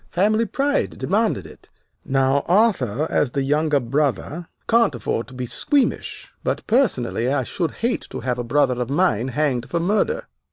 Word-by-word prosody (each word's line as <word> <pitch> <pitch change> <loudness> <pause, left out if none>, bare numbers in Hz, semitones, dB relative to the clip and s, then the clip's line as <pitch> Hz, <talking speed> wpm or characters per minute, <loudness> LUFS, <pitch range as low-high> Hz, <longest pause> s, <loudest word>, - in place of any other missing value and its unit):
Family 215 +5 +2
pride 280 +6 0
demanded - - 0
it. - - -15 0.3
Now, 135 0 +2
Arthur, 170 - +2
as 140 - +2
the 140 - 0
younger 150 +1 +2
brother, 145 +5 -1 0.2
can't 230 - +3
afford 115 -1 -2
to 130 - -13
be 125 0 -3
squeamish, 280 - -1
but - - -2
personally 130 - +1
I 140 -2 +1
should 165 +6 -2 0.2
hate 245 - -1
to - - -6
have 125 -1 -2
a - - -1
brother 125 0 +1
of 120 - -3
mine 135 - +1
hanged 130 -2 -1
for 170 - 0
murder." 215 - 0
145 Hz, 165 wpm, -22 LUFS, 125-200 Hz, 0.3 s, can't